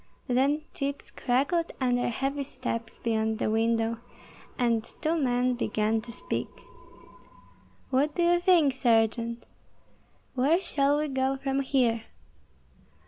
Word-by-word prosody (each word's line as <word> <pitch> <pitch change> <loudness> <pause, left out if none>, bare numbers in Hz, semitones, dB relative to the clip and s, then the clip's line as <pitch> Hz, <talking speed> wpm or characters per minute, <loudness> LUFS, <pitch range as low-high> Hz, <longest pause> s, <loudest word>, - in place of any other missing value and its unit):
Then 275 +5 +2
chips 280 0 -4
crackled 285 +7 0
under 245 -2 +1
heavy 270 +4 -2
steps 230 -4 -5
beyond 220 -1 0
the 215 - 0
window, 225 +1 +1 0.6
and 230 -3 +1
two 315 +7 -2
men 250 -4 +1
began 220 -2 0
to 235 - -10
speak, 235 - -3 1.4
"What 280 +3 +2
do 350 - +1
you 345 0 +4
think, 345 -6 +4
Sergeant? 230 -1 +1 0.9
Where 280 +7 +3
shall 285 -5 +1
we 300 +1 0
go 265 -1 0
from 270 0 -1
here?" 245 -5 +1
255 Hz, 120 wpm, -28 LUFS, 230-280 Hz, 1.4 s, you